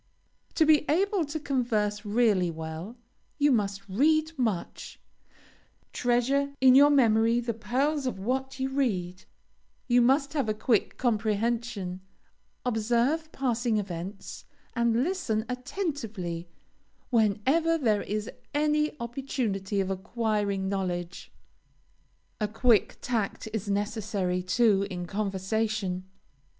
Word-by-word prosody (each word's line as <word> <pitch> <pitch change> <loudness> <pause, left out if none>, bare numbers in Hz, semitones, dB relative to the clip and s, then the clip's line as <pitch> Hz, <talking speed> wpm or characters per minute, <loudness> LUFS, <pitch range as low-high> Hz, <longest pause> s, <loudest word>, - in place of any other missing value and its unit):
To 320 - +4
be 305 -2 +5
able 375 +2 +2
to 300 +2 -4
converse 225 -7 -1
really 205 -4 +2
well, 160 +7 -6 0.4
you 290 -1 +4
must 200 -4 0
read 310 +10 +2
much, 225 - -3 0.9
treasure 270 +4 +1
in 260 -1 +7
your 285 +2 +8
memory 230 -4 +4
the 235 -1 -2
pearls 270 +5 -1
of 250 - -3
what 265 +6 -2
you 265 0 -1
read; 190 -10 -1 0.6
you 245 -1 +4
must 275 +4 +3
have 275 -8 0
a 215 - 0
quick 220 0 +1
comprehension, 220 -4 -1 0.6
observe 245 +7 +1
passing 240 -4 0
events, 190 0 -6 0.3
and 235 0 +2
listen 270 - -1
attentively 250 - -4 0.6
whenever 255 +10 +2
there 220 -8 +1
is 210 +1 -3 0.3
any 300 0 +1
opportunity 235 -5 -2
of 190 0 -2
acquiring 200 -1 -1
knowledge. 180 -3 -3 1.1
A 210 - 0
quick 225 +1 +2
tact 225 -4 -2
is 210 -2 -3
necessary, 200 -3 -1
too, 200 +1 +2
in 180 -2 -5
conversation. 195 -1 -2
225 Hz, 110 wpm, -28 LUFS, 200-265 Hz, 1.1 s, your